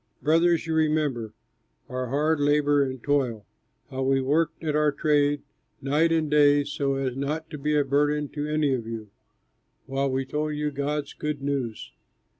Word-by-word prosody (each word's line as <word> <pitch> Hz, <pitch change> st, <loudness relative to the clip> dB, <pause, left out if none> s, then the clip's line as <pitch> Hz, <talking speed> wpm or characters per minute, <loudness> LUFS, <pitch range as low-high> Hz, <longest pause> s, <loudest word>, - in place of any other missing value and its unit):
Brothers, 165 Hz, +2 st, +3 dB
you 160 Hz, -, -2 dB
remember 150 Hz, -8 st, 0 dB, 0.5 s
our 130 Hz, -1 st, -3 dB
hard 150 Hz, +4 st, +1 dB
labor 145 Hz, 0 st, +3 dB
and 130 Hz, -2 st, -5 dB
toil, 130 Hz, -7 st, 0 dB, 0.5 s
how 130 Hz, 0 st, -3 dB
we 135 Hz, 0 st, +2 dB
worked 155 Hz, +5 st, 0 dB
at 155 Hz, -2 st, -1 dB
our 150 Hz, -1 st, +3 dB
trade 145 Hz, 0 st, +1 dB, 0.4 s
night 150 Hz, +4 st, +2 dB
and 160 Hz, -1 st, +2 dB
day 145 Hz, -1 st, +5 dB
so 140 Hz, -1 st, -1 dB
as 135 Hz, -2 st, -2 dB
not 150 Hz, +4 st, -3 dB
to 150 Hz, -, -6 dB
be 150 Hz, +2 st, 0 dB
a 145 Hz, -, +2 dB
burden 145 Hz, +2 st, +1 dB
to 145 Hz, 0 st, -4 dB
any 150 Hz, -2 st, +1 dB
of 115 Hz, -3 st, -3 dB
you, 110 Hz, -3 st, -6 dB, 0.7 s
while 135 Hz, +1 st, -1 dB
we 135 Hz, 0 st, -1 dB
told 150 Hz, +2 st, -2 dB
you 150 Hz, 0 st, -1 dB
God's 145 Hz, +1 st, -3 dB
good 150 Hz, -2 st, -4 dB
news. 135 Hz, -6 st, -3 dB
145 Hz, 170 wpm, -26 LUFS, 135-150 Hz, 0.7 s, day